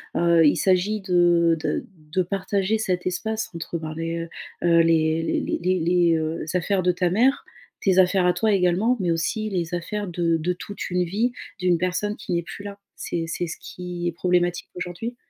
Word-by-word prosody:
heu, 170 -1 +4
il 145 - +4
s'agit 195 +3 +2
de 175 -3 +3
de 155 -1 -2 0.3
de 185 0 +2
partager 195 +3 -1
cet 180 -4 -1
espace 220 +5 -2
entre 170 0 -4
ben, 155 -1 -6
les, 165 +1 -3 0.4
heu, 170 -1 +5
les 160 -1 +2 0.2
les - - -2 0.2
les, 170 0 +3
heu, 160 +1 -2
affaires 185 +2 +1
de 180 - +4
ta 180 0 0
mère, 250 +7 +2 0.4
tes 190 -1 +3
affaires 185 0 +4
à 180 - +4
toi 220 -1 +1
également, 195 +6 +2
mais 175 -3 0
aussi 165 +7 -1
les 175 -2 -1
affaires 205 +4 -4
de 170 -1 +1
de 175 +3 -1
toute 205 +3 -7
une 180 0 +1
vie 215 +8 0 0.3
d'une 180 -2 +2
personne 185 +4 -1
qui 180 - -5
n'est 170 - +1
plus 200 - -9
là. 200 0 -8 0.2
C'est 165 -1 -3
c'est 175 +2 -2
ce 165 - -6
qui 180 -1 -5
est 175 - 0
problématique, 175 0 0
aujourd'hui? 180 +7 -5
180 Hz, 190 wpm, -24 LUFS, 170-195 Hz, 0.4 s, heu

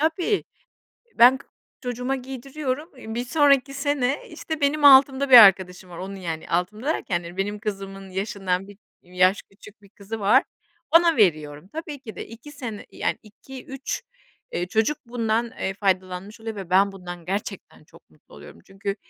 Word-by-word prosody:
Tabii, 340 +6 0 0.7
ben 250 +3 +7
k - - -18 0.4
çocuğuma 250 +1 -2
giydiriyorum, 270 +3 -5
eee, 220 -3 -8
1 240 +1 -2
sonraki, 280 -1 +3
sene, 280 -1 -1
işte, 315 -2 -6
benim 290 +1 +1
altımda 275 0 +7
bir 250 - +11
arkadaşım 185 -3 +6
var, 170 - -10
onun, 195 +2 -6
yani, 165 -4 -6
altımda 210 - -2
derken 175 - -1
yani 175 +2 -10
benim 205 +2 -2
kızımın 195 -2 -6
yaşından 195 -1 -2
1 205 -1 -14 0.2
yaş 185 +2 +2
küçük 210 +2 -17
bir 200 - -19
kızı 210 +2 -8
var, 215 +7 +4 0.5
ona 335 -1 +5
veriyorum. 155 -5 +1
Tabii 305 -3 -6
ki 230 -5 -10
de - - -7
2 230 +6 -12
sene, 245 -8 -7
yani, - - -2
2-3, 265 +5 -7 0.5
ııı, 175 +1 -2
çocuk 220 +9 +1
bundan, 230 -1 -1
eee, 190 - -4
faydalanmış 190 +1 -2
oluyor 225 -1 -5
ve 195 -3 -8
ben 195 +2 +4
bundan 175 -3 -9
gerçekten 195 +4 -5
çok - - -21
mutlu - - -24
oluyorum. - - -13
Çünkü, 195 0 -4
215 Hz, 165 wpm, -24 LUFS, 190-265 Hz, 0.7 s, bir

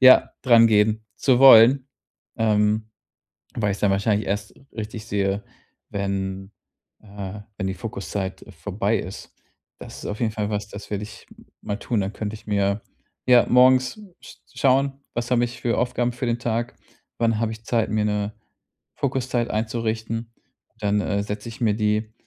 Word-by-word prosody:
ja, 130 0 +7
drangehen 110 -3 +5
zu 130 -3 +3
wollen, 130 +1 +8 0.5
ähm, 110 0 +2 0.6
weil 105 -3 0
ich - - -4
es - - -13
dann 100 - +3
wahrscheinlich 100 +1 +1
erst 100 +1 -3 0.2
richtig 110 -1 -6
sehe, 100 -1 -1 0.5
wenn 95 0 -3 0.5
äh, 100 -1 -7 0.2
wenn 95 - -2
die 95 - -2
Fokuszeit 95 0 -5 0.2
vorbei 105 +3 0
ist. 95 - -9 0.4
Das - - -10
ist - - -7
auf 105 - -5
jeden 115 -2 +1
Fall 105 -1 -2
was, 105 0 -3
das 105 0 -10
werde 105 -1 -2
ich 105 - -12 0.4
mal 100 - -3
tun. 115 -2 -1
Dann 100 +1 -2
könnte 105 0 -4
ich 110 - -12
mir 100 0 +1 0.5
ja, 125 -1 +7
morgens 130 - +4 0.2
sch - - -13 0.2
schauen: 135 0 +2
was 120 +1 -3
habe 120 -1 +3
ich 120 0 -7
für 120 -1 0
Aufgaben 125 0 0
für 125 +1 -4
den 120 0 0
Tag? 120 0 -2 0.4
Wann 115 -2 +1
habe 115 -1 0
ich 110 0 -10
Zeit, 115 -1 0
mir 105 0 +1
'ne 105 0 -1 0.6
Fokuszeit 130 -3 -1
einzurichten? 115 +1 -2 0.5
Dann, 105 -1 +1
äh, 100 0 -1
setze 105 +2 -5
ich 115 - -12
mir 110 -3 +2
die 105 0 0
110 Hz, 165 wpm, -23 LUFS, 105-120 Hz, 0.6 s, wollen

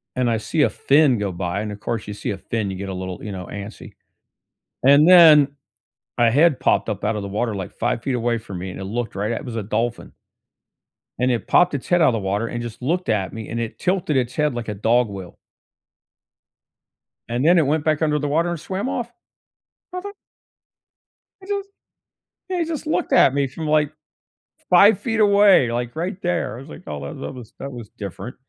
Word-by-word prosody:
and 125 -1 +1
I 115 - +1
see 150 +8 -1
a - - +4
fin 140 -3 +3
go 100 -2 -2
by, 90 +2 -3
and 105 0 -4
of 105 - -8
course, 115 0 -4
you 105 - -5
see 105 - -4
a 100 - -4
fin, 105 0 -3
you 95 - -6
get 100 +1 -5
a - - -4
little, 95 -1 -6
you 105 - -5
know, 90 -2 -7
antsy; 105 +1 -9 0.9
and 140 +4 +6
then, 160 -6 +8 0.7
a 120 -1 +4
head 150 +2 +3
popped - - +2
up - - -3
out 110 - 0
of 105 - -4
the 100 - -5
water, 110 +3 -2
like 95 -2 -6
5 120 0 -2
feet 135 - -2
away 120 -1 0
from 100 -5 -8
me, 95 +2 -5
and 90 - -8
it - - -5
looked 115 +3 -4
right 105 +3 -1
at 115 - -3
it - - -11
was 120 -2 -6
a 110 - -2
dolphin, 115 +3 -3 1.1
and 125 +1 +2
it 120 -2 -1
popped 180 0 +4
its 140 - -5
head 175 -1 +3
out 155 - +6
of - - +2
the - - 0
water 100 +3 -1
and 120 -1 -4
just 120 0 -8
looked 175 +8 -1
at 100 -4 0
me, 110 -1 -7
and 115 +1 -3
it 115 - -5
tilted 180 -5 0
its 125 -1 0
head 150 -2 0
like 120 -1 -5
a 105 - -2
dog 115 +4 +2
will 95 -3 -9 1.9
and 120 +4 -1
then 175 +2 +6
it 160 - +4
went 150 +2 0
back 155 0 +1
under 150 -1 +1
the 145 - -2
water 165 +4 +1
and 175 -2 -3
swam 195 - -4
off. 240 -3 -3 0.8
I 365 - -4
ju 405 +2 -7 1.3
I - - -13
just 400 -1 -3 0.8
Yeah, 370 -1 -2
he 340 - +1
just 320 -1 -5
looked 310 - -1
at 135 - +5
me 140 -1 +1
from, 155 +5 -6
like, 150 -1 +2 0.8
5 200 +3 +6
feet 225 -2 -2
away, 200 - +5
like 120 +1 -3
right 175 +3 -3
there. 175 - -1
I - - -9
was 135 +3 -12
like, 175 - -11
"Oh, - - -4
well, - - -6
that 135 - -6
was 125 -4 -11
that 140 - -6
was 120 -5 -9
different." 105 +5 -8
125 Hz, 225 wpm, -21 LUFS, 110-160 Hz, 1.9 s, then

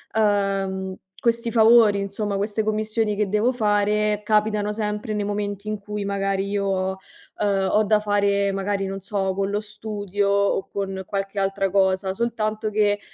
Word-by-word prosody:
uhm, 195 -3 0 0.3
questi 235 0 +1
favori, 225 -2 +6
insomma, 200 +1 -3
queste 205 +2 -1
commissioni 215 0 0
che 205 -2 0
devo 215 +5 +2
fare, 210 -2 +1
capitano 210 -1 +1
sempre 210 0 -3
nei 210 -1 -1
momenti 205 0 -3
in 215 - -2
cui 205 0 -5
magari 195 0 -1
io, 190 -2 -1 0.4
uhm, 195 -2 +1
ho 215 - +3
da 215 0 +3
fare 200 -1 +1
magari 195 0 -1
non 195 0 -5
so, 195 -1 -2
con 195 +1 -1
lo 205 - 0
studio 205 -2 -3
o 200 -1 +1
con 195 -1 -4
qualche 195 +1 -4
altra 195 0 0
cosa, 190 0 +1
soltanto 220 -2 -1
che, 205 -1 +2
205 Hz, 155 wpm, -23 LUFS, 195-215 Hz, 0.4 s, favori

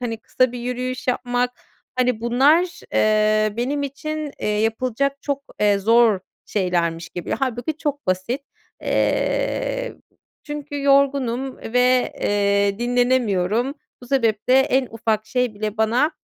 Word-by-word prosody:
hani, 235 -2 -3
kısa 255 +2 +1
bir 245 - -5
yürüyüş 250 +1 -4
yapmak, 245 0 0 0.5
hani, 250 -3 +1
bunlar, 290 +9 +3
eee, 215 0 +3
benim 275 +4 -1
için, 300 +2 -4
eee, - - -2
yapılacak 240 +6 0
çok, 280 -1 -2 0.2
eee, 205 -1 +4
zor 225 -1 +4 0.3
şeylermiş 170 -4 -1
gibi. 175 - -7
Hâlbuki 260 +3 -2
çok 290 - -3
basit. 185 +8 -1 0.4
Eee, - - 0 0.5
çünkü 295 -1 -5
yorgunum 275 -2 +2
ve, 250 +2 +2
eee, 200 0 +1
dinlenemiyorum. 245 -1 +1 0.3
Bu 245 - -10
sebeple 240 -1 +2
en 265 -1 +2
ufak 220 -1 -1
şey 250 -1 0
bile 210 +1 -4
bana, 235 +7 +2
245 Hz, 120 wpm, -22 LUFS, 215-275 Hz, 0.5 s, eee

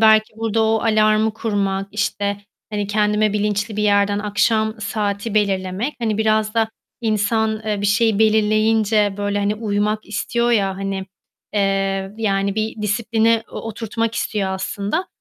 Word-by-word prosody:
belki, 220 0 +5
burada 225 0 0
o 220 0 +2
alarmı 215 -1 +3
kurmak, 200 -3 -1
işte, 205 -1 -1 0.3
hani, 205 -1 -2
kendime 210 0 +1
bilinçli 210 0 -1
bir 210 - 0
yerden 205 -1 +3
akşam 215 +1 +1
saati 205 +1 -2
belirlemek, 195 +4 0
hani, 220 -3 -1
biraz 215 0 +1
da 225 -1 +2 0.3
insan, 220 0 0
eee, 210 -2 -1
bir 205 - 0
şeyi 205 +1 +2
belirleyince 215 -1 +3
böyle, 205 0 -1
hani, 205 +1 0
uymak 210 0 -1
istiyor 235 +3 -1
ya, 195 -4 +1
hani, 195 -1 -3 0.5
eee, 195 -1 0
yani 200 -3 0
bir 220 0 -3
disiplini 225 +1 +2
o - - -6
oturtmak 225 +1 -3
istiyor 205 -5 -1
aslında. 200 - -2
210 Hz, 140 wpm, -20 LUFS, 200-220 Hz, 0.5 s, belki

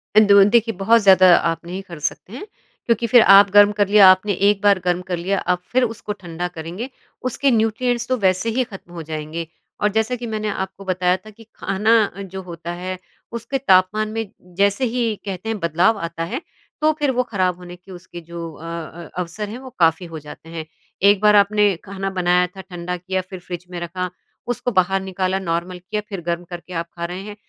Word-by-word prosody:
अंदो 200 -2 +7
देखिए 230 -1 +3
बहुत 230 +3 +5
ज़्यादा 185 -3 +7
आप 165 -1 0
नहीं 180 +3 -5
कर 170 -3 -8
सकते 195 - -9
हैं। 270 +11 -7 0.4
क्योंकि 235 0 +1
फिर 245 - +8 0.2
आप 200 0 +6
गर्म 205 +1 +7
कर 205 -2 +3
लिया, 205 -1 +7
आपने 200 +2 +1 0.2
1 205 -1 0
बार 200 -2 +5
गर्म 180 0 +1
कर 175 - 0
लिया, 190 +3 -1
आप 180 0 -1
फिर 255 +1 +3
उसको 220 -3 -3
ठंडा 175 0 -4
करेंगे 175 +10 -6 0.4
उसके 275 +2 +1
न्यूट्रिएंट्स 235 +2 0
तो 255 - 0
वैसे 190 +1 +1
ही 260 - +3
खत्म 195 -7 -12
हो 170 -2 -6
जाएँगे 155 +1 -5 0.3
और 210 - +3
जैसा 220 +3 +1
कि 240 - -4
मैंने 215 -1 -3
आपको 190 0 -5
बताया 185 0 +1
था 215 +4 -15
कि 215 +2 -16
खाना 210 +4 +2 0.4
जो 190 - -5
होता 170 -2 -7
है 185 0 -4 0.4
उसके 235 +4 -3
तापमान 210 -2 +3
में 225 -2 -4 0.3
जैसे 200 +5 +2
ही 245 -1 +1 0.2
कहते 195 +2 -5
हैं 220 - -2
बदलाव 175 +6 +2
आता 165 0 -5
है 265 - -2 0.4
तो 310 +1 +4
फिर 290 -2 +2
वो 250 0 +1
खराब 185 -3 0
होने 180 0 -10
के 180 +2 -17
उसके 175 -1 -10
जो 170 +1 -9
अ 155 - -13
अ, 170 0 -7
अवसर 180 +4 -4
हैं 235 - -7
वो 260 0 -10
काफ़ी 165 +1 +3
हो 160 -1 -7
जाते 150 +2 -12
हैं। 165 -1 -6 0.4
1 205 -1 +4
बार 210 0 +5
आपने 205 -1 +4
खाना 195 0 -4
बनाया 180 0 +3
था, 190 +2 -11
ठंडा 180 -1 -5
किया, 185 +1 -2
फिर 185 0 -10
फ्रिज 180 0 -8
में 175 - -5
रखा, 180 +2 -4 0.4
उसको 245 0 -2
बाहर 190 -1 +2
निकाला, 190 0 -2
नॉर्मल 175 0 -3
किया, 190 +4 -4
फिर 195 -4 -5
गर्म 170 0 -1
करके 175 +1 -8
आप 170 - -7
खा 170 0 -4
रहे 180 +2 -5
हैं। 210 0 -8
190 Hz, 210 wpm, -21 LUFS, 175-215 Hz, 0.4 s, फिर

